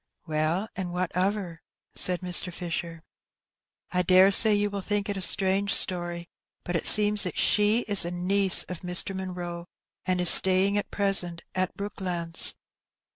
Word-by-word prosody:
" - - -51
Well, 160 +5 -3
and 185 -2 -7
what 180 0 -5
of 190 +3 -2
her? 175 -6 -10 0.2
" - - -68
said 180 -1 +1
Mr. 180 0 +2
Fisher. 170 -1 -8 0.4
" - - -49
I 180 0 -1
daresay 190 +4 +4
you 205 0 -3
will 200 -1 -6
think 205 +1 -4
it 205 - -4
a 190 - -7
strange 195 +2 0
story, 175 -1 0 0.4
but 175 - -7
it 170 - +2
seems 210 -2 +5
she 210 +3 +1
is 205 -4 +2
a 170 - -5
niece 185 +2 +2
of 180 -2 -10
Mr. 180 +2 0
Munroe, 175 -2 -8 0.4
and 185 -1 -2
is 180 -2 +6
staying 190 +2 +3
at 205 - -4
present 190 -4 -1
at 185 -1 -4
Brooklands. 180 -4 +1
185 Hz, 170 wpm, -24 LUFS, 175-200 Hz, 0.4 s, is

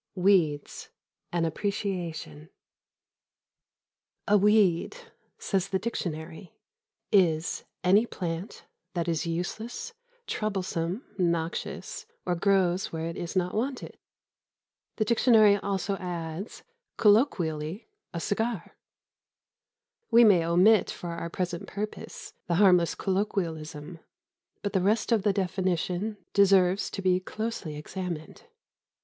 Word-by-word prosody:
XX 180 - -3
WEEDS: 165 -7 +2 0.4
AN 170 -1 +1
APPRECIATION 170 - -3 1.8
A 210 - +5
weed, 205 - +3 0.4
says 195 -2 -1
the 195 - 0
dictionary, 170 -5 -5 0.6
is 170 -6 +2 0.2
"any 200 +6 +4
plant 175 0 -5 0.3
that 170 0 -1
is 165 0 -1
useless, 220 - -4 0.3
troublesome, 190 -1 -2
noxious 170 -2 -2 0.2
or 180 - +1
grows 185 0 +2
where 160 0 -3
it 165 - -6
is 175 +2 -5
not 180 -1 0
wanted." 255 +4 -3 1.0
The 215 - 0
dictionary 220 -3 +5
also 195 0 -2
adds: 175 +1 -6 0.3
"colloq., 190 - +2 0.3
a 170 - -4
cigar." 220 +1 -2 1.3
We 235 +1 +7
may 195 -7 +6
omit 180 +5 +4
for 175 - -5
our 170 0 -4
present 175 -1 -3
purpose 210 +1 -6
the 170 - +1
harmless 180 -3 +5
colloquialism, 170 -5 -3 0.6
but 205 - -2
the 190 - +2
rest 215 +5 +1
of 225 -3 +4
the 205 +1 +2
definition 190 +1 -1 0.2
deserves 195 -1 +4
to 195 - -6
be 185 -1 +3
closely 215 -5 -5
examined. 165 +1 -6
185 Hz, 105 wpm, -28 LUFS, 170-205 Hz, 1.8 s, We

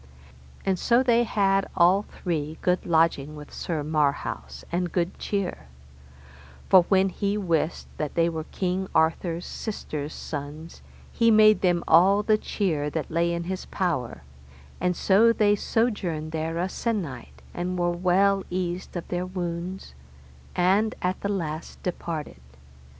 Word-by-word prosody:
And 190 -2 +1
so 245 +1 +3
they 240 -1 +3
had 195 -2 +2
all 180 +3 +5
three 160 -6 -4
good 180 0 +1
lodging 160 -3 +2
with 150 -1 -11
Sir 160 -4 -3
Marhaus, 150 -2 -1
and 175 0 -1
good 175 0 -1
cheer; 200 - -3 1.0
for 185 -2 +7
when 195 -1 +4
he 200 +2 -1
wist 170 -4 -1
that 150 -2 -3
they 170 0 +3
were 160 -2 -3
King 185 +1 -2
Arthur's 165 +2 +1
sister's 155 -9 -5
sons 150 +2 -7 0.3
he 230 -1 +3
made 215 -1 +6
them 175 -2 +2
all 195 +5 +5
the 215 0 +3
cheer 160 -11 -1
that 155 0 -4
lay 170 +1 +1
in 170 0 -2
his 185 +2 -5
power, 155 - -2 0.6
and 180 0 0
so 205 +6 +4
they 210 -2 +3
sojourned 195 -9 -1
there 160 +1 -2
a 175 +2 0
sennight, 185 - -4
and 180 +1 -3
were 175 0 +1
well 190 +3 +2
eased 180 0 -3
of 170 - -6
their 180 +1 -2
wounds, 180 - -5 0.6
and 195 +5 +2
at 180 +1 -1
the 200 - -2
last 165 -5 -4
departed. 160 - -4
175 Hz, 145 wpm, -26 LUFS, 160-195 Hz, 1.0 s, for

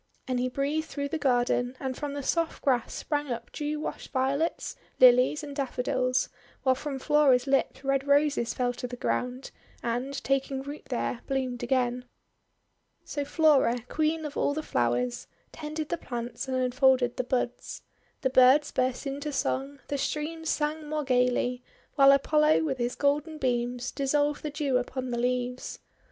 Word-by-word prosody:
And 255 -1 0
he 255 +1 0
breathed 290 +4 -1
through 285 -2 -4
the 320 - -2
garden, 245 -1 +1
and 260 -2 -3
from 290 +1 -4
the 285 - -4
soft 330 +3 -1
grass 255 -5 +1
sprang 295 -1 -2
up 235 0 -5
dew 300 0 -3
washed - - -6
Violets, 275 +5 -1 0.2
Lilies, 255 +4 +6
and 285 -1 -7
Daffodils; 255 -2 0 0.4
while 260 - +4
from 275 +1 -4
Flora's 270 -3 +4
lips 270 0 0
Red 275 0 0
Roses 285 -4 +3
fell 245 -1 0
to 250 0 -5
the 245 - -7
ground, 250 +1 -2 0.3
and, 245 +4 -2
taking 270 0 0
root 285 +2 -8
there, 245 -1 -2
bloomed 260 -2 -2
again. 250 0 0 1.0
So 290 - -3
Flora, 280 -6 +3
Queen 315 +1 0
of 295 - -6
all 285 - +1
the 310 - -3
Flowers, 120 - 0 0.2
tended 310 0 -5
the 340 - -1
plants 240 +1 -5
and 260 -1 -1
unfolded 255 -1 +3
the 255 - 0
buds. 250 -1 -3 0.4
The 265 -3 +1
birds 260 +3 +6
burst 255 +1 -1
into 285 +2 -3
song, 275 0 -2
the 285 - -2
streams 320 +3 -3
sang 300 0 -1
more 305 0 -1
gayly, 250 -1 +1 0.3
while 275 -1 +7
Apollo 300 +3 +4
with 270 -5 -2
his 240 +1 -1
golden 295 +2 0
beams 245 -2 -1
dissolved 290 +1 0
the 305 - -3
Dew 285 -3 0
upon 255 0 -3
the 240 - -1
leaves. 250 0 -2
270 Hz, 165 wpm, -28 LUFS, 250-295 Hz, 1.0 s, while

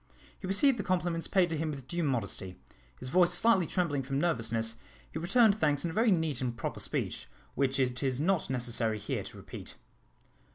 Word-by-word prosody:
He 190 - -6
received 235 +6 +3
the - - -1
compliments 175 -3 -1
paid 180 -4 +2
to 160 - -1
him 160 0 -1
with 135 -4 -7
due 175 +3 -2
modesty. 100 - -2 0.4
His - - -6
voice 180 +4 +4
slightly 190 -4 +4
trembling 165 -7 0
from 135 +1 -3
nervousness, 115 -7 0 0.3
he 160 - -4
returned 215 +4 +4
thanks 145 -2 +2
in 170 - -1
a - - -8
very 225 +4 +3
neat 160 - +1
and 120 -2 -2
proper - - -4
speech, - - -3 0.3
which 135 0 0
it 125 -1 0
is 130 -2 0
not 175 0 +1
necessary 120 -3 -1
here 105 - -3
to - - -9
repeat. - - -9
155 Hz, 195 wpm, -31 LUFS, 125-180 Hz, 0.4 s, voice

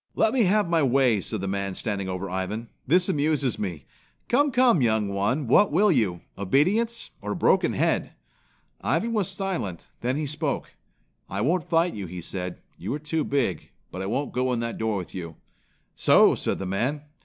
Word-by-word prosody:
"Let 220 - +3
me 245 -5 +3
have 205 +1 +3
my 170 -1 +2
way," 130 -5 +3
said 110 +2 -3
the 95 - -3
man 100 0 -2
standing 100 -4 -3
over 90 +1 -3
Ivan. 95 +5 -4 0.2
"This 180 +6 +4
amuses 145 -4 +1
me. 85 -9 -4 0.4
Come, 285 +4 +4
come, 245 - +4
young 110 -3 +2
one, 105 +9 0
what 165 - +4
will 200 +6 +4
you 105 - +1 0.2
obedience 195 - +1
or - - -3
a - - -4
broken - - +3
head?" - - 0 0.7
Ivan 230 +1 0
was 205 -4 +1
silent, 185 - -3
then 125 +2 0
he 150 +1 -1
spoke. 150 0 -3 0.6
"I 100 +2 -3
won't 165 +7 0
fight," 170 +1 +2
he 90 -3 -6
said. 90 +1 -5 0.2
"You 95 - -4
are - - -5
too 155 +1 -1
big, 125 - -1 0.2
but 95 - -5
I 95 - -3
won't 130 +7 -2
go 130 0 0
in 120 - -1
that 115 0 -4
door 110 -2 0
with 90 - -6
you." 85 -4 -6 0.6
"So!" - - +5
said - - -2
the 95 - -5
man. 125 +11 -1
125 Hz, 190 wpm, -25 LUFS, 100-165 Hz, 0.7 s, So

